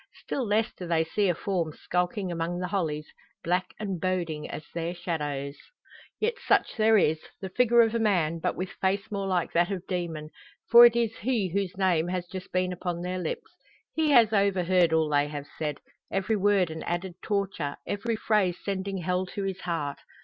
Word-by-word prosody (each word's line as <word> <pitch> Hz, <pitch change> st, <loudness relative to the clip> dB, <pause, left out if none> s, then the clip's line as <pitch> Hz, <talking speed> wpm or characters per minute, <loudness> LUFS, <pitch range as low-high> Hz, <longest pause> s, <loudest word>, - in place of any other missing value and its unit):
Still 270 Hz, -, -2 dB
less 215 Hz, +2 st, +1 dB
do 180 Hz, -, -8 dB
they 165 Hz, -1 st, +2 dB
see 195 Hz, +4 st, 0 dB
a 175 Hz, -, +1 dB
form 170 Hz, -4 st, -2 dB
skulking 180 Hz, +3 st, -1 dB
among 170 Hz, +1 st, -2 dB
the 180 Hz, -, -2 dB
hollies, 160 Hz, -6 st, -1 dB, 0.4 s
black 180 Hz, +2 st, +1 dB
and 195 Hz, -5 st, -3 dB
boding 175 Hz, -5 st, -2 dB
as -, -, -6 dB
their 170 Hz, +1 st, -3 dB
shadows. 145 Hz, -5 st, -3 dB, 0.6 s
Yet 470 Hz, +2 st, 0 dB
such -, -, +2 dB
there 220 Hz, 0 st, +5 dB
is; 160 Hz, -5 st, +3 dB, 0.2 s
the 190 Hz, -, -5 dB
figure 235 Hz, +3 st, +5 dB
of 225 Hz, -1 st, +3 dB
a 230 Hz, -, +1 dB
man, 170 Hz, -7 st, +1 dB
but -, -, -1 dB
with 185 Hz, +1 st, -4 dB
face 195 Hz, +3 st, 0 dB
more 200 Hz, -1 st, -2 dB
like 180 Hz, -2 st, 0 dB
that 175 Hz, +3 st, +2 dB
of 190 Hz, -2 st, -4 dB
demon 165 Hz, -4 st, -4 dB, 0.4 s
for 240 Hz, +1 st, +11 dB
it 235 Hz, -, -1 dB
is 230 Hz, -2 st, 0 dB
he 220 Hz, -5 st, 0 dB
whose 190 Hz, 0 st, -2 dB
name 175 Hz, -4 st, +2 dB
has 180 Hz, 0 st, -2 dB
just 185 Hz, +1 st, -8 dB
been 185 Hz, 0 st, 0 dB
upon 175 Hz, -1 st, -4 dB
their 180 Hz, +1 st, -2 dB
lips. 470 Hz, -, -4 dB, 0.4 s
He 315 Hz, -1 st, +1 dB
has 235 Hz, -6 st, +6 dB
overheard 185 Hz, -4 st, +3 dB
all 160 Hz, -1 st, +3 dB
they 145 Hz, -1 st, +2 dB
have 145 Hz, -1 st, -6 dB
said; 150 Hz, -3 st, -2 dB, 0.3 s
every 195 Hz, +3 st, 0 dB
word 200 Hz, -4 st, +3 dB
an 160 Hz, 0 st, -6 dB
added 175 Hz, +1 st, -3 dB
torture, 195 Hz, -8 st, -2 dB
every 225 Hz, +3 st, -2 dB
phrase 205 Hz, -5 st, +1 dB
sending 195 Hz, 0 st, -2 dB
hell 180 Hz, +2 st, 0 dB
to 200 Hz, +2 st, -5 dB
his 195 Hz, -1 st, -3 dB
heart. 150 Hz, -5 st, -3 dB
185 Hz, 195 wpm, -27 LUFS, 170-200 Hz, 0.6 s, for